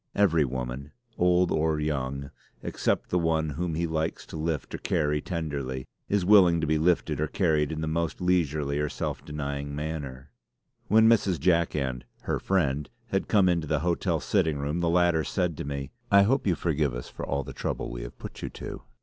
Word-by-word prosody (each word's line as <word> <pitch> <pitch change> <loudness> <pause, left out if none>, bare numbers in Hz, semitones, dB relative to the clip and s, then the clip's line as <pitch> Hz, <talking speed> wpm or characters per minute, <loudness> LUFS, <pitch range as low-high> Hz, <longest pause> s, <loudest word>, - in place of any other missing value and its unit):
Every 85 -7 +4
woman, 65 +2 -5 0.2
old 90 0 +3
or 80 0 +1
young, 70 -2 -2 0.3
except - - -1
the 90 - +3
one 80 -2 +1
whom 80 +2 -2
he 85 +2 0
likes 80 -1 -2
to - - -10
lift 80 -1 -2
or - - -4
carry 75 0 0
tenderly, 70 -7 -3 0.2
is 100 -3 +1
willing 90 -4 +6
to 80 - 0
be 80 0 +1
lifted 85 -2 +1
or 75 - +1
carried 75 -3 +1
in 80 0 -3
the 80 - -2
most 80 0 -1
leisurely 75 -5 +1
or 75 0 0
self - - -4
denying 70 -1 -4
manner. 75 -3 -5 0.6
When 110 +2 +6
Mrs. 100 -7 +3
Jack 85 +1 +2
and 65 -3 -2 0.2
'her - - -1
friend' 75 -7 0 0.2
had 95 - 0
come 100 -4 +4
into 85 -3 +1
the 75 0 0
hotel 85 0 0
sitting 80 -2 +1
room 70 +4 -2
the 85 -1 +1
latter 85 -2 +3
said 90 -2 -1
to - - -4
me: 70 -1 -4 0.2
"I 100 -2 +7
hope 130 +3 +1
you 90 - +3
forgive 75 -7 0
us - - -6
for - - -8
all 70 0 -1
the 70 0 -8
trouble - - -3
we - - -5
have - - -8
put - - -9
you - - -3
to." - - -7
80 Hz, 200 wpm, -27 LUFS, 70-85 Hz, 0.6 s, I